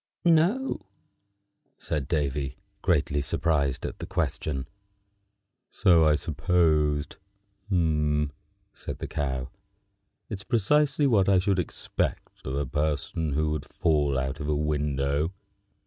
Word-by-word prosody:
"No," 175 - +3 1.0
said 70 -3 -3
Davy, 70 -4 -1 0.2
greatly 70 0 +1
surprised 70 -2 0
at - - -5
the - - -6
question. 70 -4 -2 1.0
"So 85 -3 +5
I 75 - +5
supposed," 80 -2 +1 0.5
said 75 -5 -2
the - - -5
Cow. 65 -3 -2 0.8
"It's 100 -2 -6
precisely 145 +7 +2
what 105 -8 +4
I 95 - +5
should 95 0 +2
expect 85 - -3
of 65 - -2
a 70 0 0
person 75 +2 -1
who 75 +1 +1
would 75 -2 -3
fall 75 -4 +1
out 65 +2 -2
of 75 - -4
a 75 - +1
window." 75 +1 0
75 Hz, 115 wpm, -27 LUFS, 70-90 Hz, 1.0 s, So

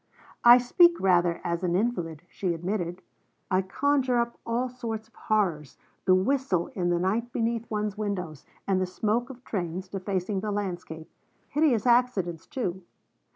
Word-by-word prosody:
'I 240 +1 +10
speak 340 +8 +4
rather 175 -2 +3
as 170 +1 -2
an 175 -1 +1
invalid,' 175 -7 -1
she 180 -2 -2
admitted; 175 0 -3 0.5
'I 185 0 +4
conjure 260 +5 +1
up 235 0 -1
all 240 +2 0
sorts 225 -3 -5
of - - -38
horrors, 175 - -1 0.3
the 185 -1 +6
whistle 195 -3 +1
in 180 -6 -1
the 175 - +2
night 215 +7 -1
beneath 230 0 -1
one's 210 -1 -2
windows, 180 -8 -3 0.2
and 190 -1 +2
the 185 - 0
smoke 220 +6 -1
of 255 -1 -11
trains 185 -3 -4
defacing 190 +1 -2
the 210 +2 -3
landscape; 180 -6 -4 0.4
hideous 285 -7 +2
accidents 235 -9 +2
too. 210 -11 -3
200 Hz, 155 wpm, -27 LUFS, 180-235 Hz, 0.5 s, I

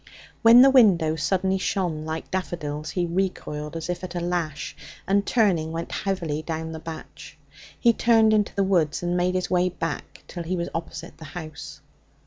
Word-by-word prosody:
When 235 +2 +9
the 270 - +7
window 180 -11 +5
suddenly 190 +4 0
shone 175 -5 -1
like 160 0 -5
daffodils, 155 -5 -3
he 180 -2 -1
recoiled 170 -4 -3
as 165 - -5
if 180 +1 -4
at 180 -1 -6
a - - 0
lash, 170 -4 -3 0.3
and, 200 +1 +2
turning, 180 -9 +2
went 165 +1 -5
heavily 170 -7 -2
down 160 0 -4
the 160 - -6
batch. 160 0 -10 0.4
He 235 -1 +5
turned 225 -2 +4
into 210 -1 +1
the 200 - +2
woods, 175 -5 +1
and 175 0 0
made 180 +1 +1
his 185 0 -2
way 180 0 +3
back 165 -3 -5
till 175 - -6
he 170 +2 -2
was 170 - -2
opposite 165 -1 -6
the 160 - -9
house. 155 -3 -8
175 Hz, 180 wpm, -25 LUFS, 160-190 Hz, 0.4 s, When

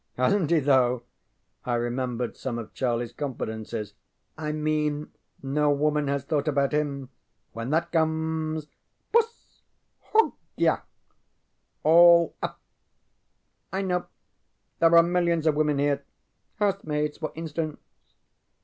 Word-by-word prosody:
ŌĆØ 130 - +2
ŌĆ£HasnŌĆÖt 190 -7 +1
he, 170 -1 +4
though! 130 -3 +3
ŌĆØ 120 +1 -12
I - - +2
remembered 120 0 -2
some 125 -3 -4
of 115 -2 -7
CharlieŌĆÖs 120 -2 -2
confidences. 110 -6 -4 0.5
ŌĆ£I 150 -1 -2
mean 150 -1 -1 0.3
no 145 +2 +1
woman 150 0 +1
has 140 -1 -1
thought 145 0 -1
about 140 -2 +2
him. 140 -3 -1 0.4
When 115 +2 -5
that 170 +3 0
comes; 160 -1 0 0.5
bus 460 0 0 0.5
hogya 445 +1 +1 1.0
all 170 +1 +7
up! - - -4 1.1
I 190 +2 -1
know. 180 -2 -1 0.7
There 165 0 +6
are 170 - +8
millions 170 -2 +1
of 155 - +4
women 150 -1 +1
here. 140 0 +1 0.5
Housemaids, 155 -8 -1
for 155 - -3
instance. 160 -1 -4
150 Hz, 120 wpm, -26 LUFS, 135-165 Hz, 1.1 s, are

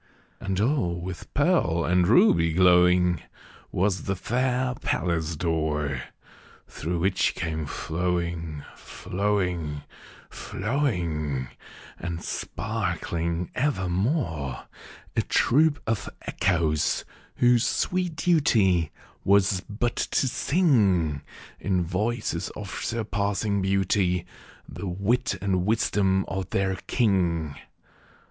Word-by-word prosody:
And 95 -1 -2
all 105 - +1
with 90 -1 -7
pearl 140 - +2
and 90 +2 +3
ruby 85 -6 +5
glowing 90 0 +4 0.5
Was 95 +1 0
the 100 - 0
fair 125 +5 0
palace 85 -2 -1
door, 75 -5 -1 0.7
Through 85 +3 -3
which 95 +3 +1
came 80 -2 -3
flowing, 85 -3 -2
flowing, 90 -7 -2 0.4
flowing, 85 - -2 0.5
And 85 -1 -4
sparkling 85 +1 -3
evermore, 95 - -1 0.5
A - - +3
troop 145 +3 +3
of 115 -1 -1
Echoes, 80 -5 0 0.3
whose 120 0 +4
sweet 180 -2 0
duty 110 - +3 0.3
Was 100 -1 +3
but 115 +3 -1
to 135 - +1
sing, 105 - +2 0.4
In 95 -3 0
voices 105 +7 -2
of - - -7
surpassing 100 -2 -1
beauty, 95 -2 +1 0.4
The 100 - -6
wit 100 +5 0
and 95 -2 +1
wisdom 100 -3 +2
of 95 -1 -4
their 95 -1 0
king. 85 - +1
95 Hz, 95 wpm, -26 LUFS, 85-110 Hz, 0.7 s, ruby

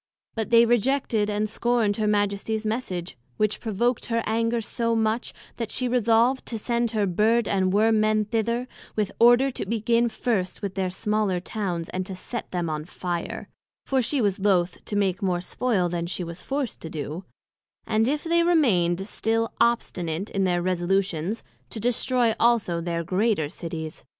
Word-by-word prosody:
But 220 -2 -3
they 235 0 +7
rejected 240 -2 +1
and 210 +1 0
scorned 225 -2 +1
her 215 -1 0
Majesties 205 +1 0
Message, 185 - -3 0.2
which 215 0 +1
provoked 235 +2 -1
her 230 -1 0
anger 230 +1 +1
so 230 +1 -1
much, 220 +1 0 0.3
that 230 -2 -3
she 255 - -1
resolved 240 +1 +3
to 230 - -2
send 235 +1 0
her 215 -2 0
Bird 215 +5 +2
and 190 -2 +1
Worm 220 +2 +3
men 215 0 +2
thither, 235 +3 -1 0.3
with 210 -2 0
order 245 +3 +6
to - - -4
begin 230 +3 +1
first 215 -5 -2
with 200 -2 -2
their 190 -1 -1
smaller 210 0 0
Towns, 180 -3 -3
and 185 0 -3
set 235 +5 -6
them 175 -2 -2
on 155 -1 -3
fire 175 -1 -4 0.4
(for 265 -1 +2
she 265 +3 0
was 200 -3 +1
loath 185 -3 +1
to 205 - -4
make 195 -3 +1
more 185 -3 +1
spoil 195 0 0
then 170 0 -2
she 180 +1 -3
was 170 +1 -7
forced 275 -3 -3
to 160 - -6
do) 155 +3 -5 0.6
and 220 +1 +2
if 295 +2 0
they 340 0 +3
remain'd 195 - +2
still 225 +1 0
obstinate 185 -6 0
in 195 -1 +1
their 175 -1 +1
resolutions, 185 +1 0 0.3
to 225 - -5
destroy 245 0 +2
also 225 -8 +2
their 170 0 -2
greater 185 -3 +1
Cities. 160 -1 -6
215 Hz, 170 wpm, -25 LUFS, 185-235 Hz, 0.6 s, they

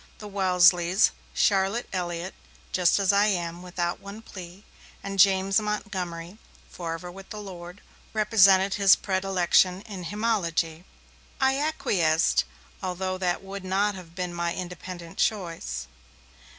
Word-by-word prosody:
The 210 - -9
Wesleys, 180 -1 +4 0.2
Charlotte 195 +4 +2
Elliott 175 0 -3 0.4
('Just 180 -2 +3
as 200 -1 +2
I 200 +1 +4
am, 175 -3 -2
without 175 -1 -3
one 200 +3 -10
plea'), 185 -1 -10 0.4
and 195 0 -5
James 195 +1 +5
Montgomery 190 -3 -4 0.3
('Forever 170 +1 -5
with 195 +1 -12
the 215 - -7
Lord') 180 -1 -9 0.3
represented 200 -3 +4
his 200 -2 +6
predilection 190 -1 +1
in 195 -6 -8
hymnology. 180 -5 -1 0.5
I 265 0 +3
acquiesced, 175 - +2 0.4
although 185 0 -3
that 180 0 -1
would 195 0 -7
not 195 +2 +1
have 175 -3 -11
been 180 -1 -3
my 170 0 -2
independent 180 -1 -8
choice. 165 - -1
185 Hz, 125 wpm, -26 LUFS, 175-200 Hz, 0.5 s, his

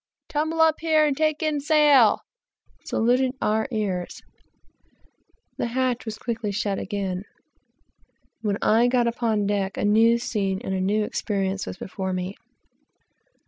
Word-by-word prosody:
tumble 315 +2 -2
up 320 -1 +4
here 315 -1 +3
and 290 -2 +1
take 310 +1 0
in 305 -2 0
sail," 290 -6 +4 0.6
saluted 250 +3 +1
our 220 +3 0
ears, 200 -6 -3
and - - -39 0.7
the - - 0
hatch 250 0 -1
was 220 -1 -5
quickly 225 -3 -3
shut 200 -1 -2
again. 195 -2 -3 1.2
When 205 -2 -1
I 230 +3 +4
got 245 -1 +2
upon 230 -3 0
deck, 200 -1 -1
a - - 0
new 225 +3 +4
scene 195 -5 -2
and 190 - -3
a 190 - -1
new 210 +3 +1
experience 195 -2 -2
were - - -4
before 190 0 -4
me. 185 +2 -4
220 Hz, 140 wpm, -24 LUFS, 200-260 Hz, 1.2 s, up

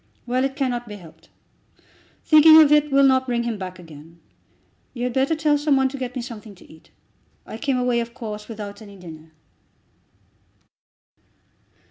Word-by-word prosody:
Well, 250 +1 -1
it 270 0 -2
cannot 245 -4 -3
be 210 - -8
helped. 165 -3 -16 1.0
Thinking 315 +1 +7
of 300 -2 +5
it 300 -1 +3
will 275 0 +4
not 260 -1 +3
bring 240 -1 -1
him 230 -3 -4
back 185 -1 -7
again. 165 -1 -15 0.8
You 240 - -5
had 250 -1 -2
better 270 +5 +1
tell 300 -1 +1
some 295 -1 +1
one 265 0 +1
to 275 - -8
get 250 0 -6
me 250 - -4
something 220 -4 -10
to - - -18
eat. 160 0 -19 0.6
I 220 - -9
came 275 -1 -1
away, 250 -1 0
of 235 0 -6
course, 210 -2 -8
without 210 -2 -9
any 200 -2 -13
dinner." 160 -3 -13
240 Hz, 170 wpm, -22 LUFS, 200-270 Hz, 1.0 s, Thinking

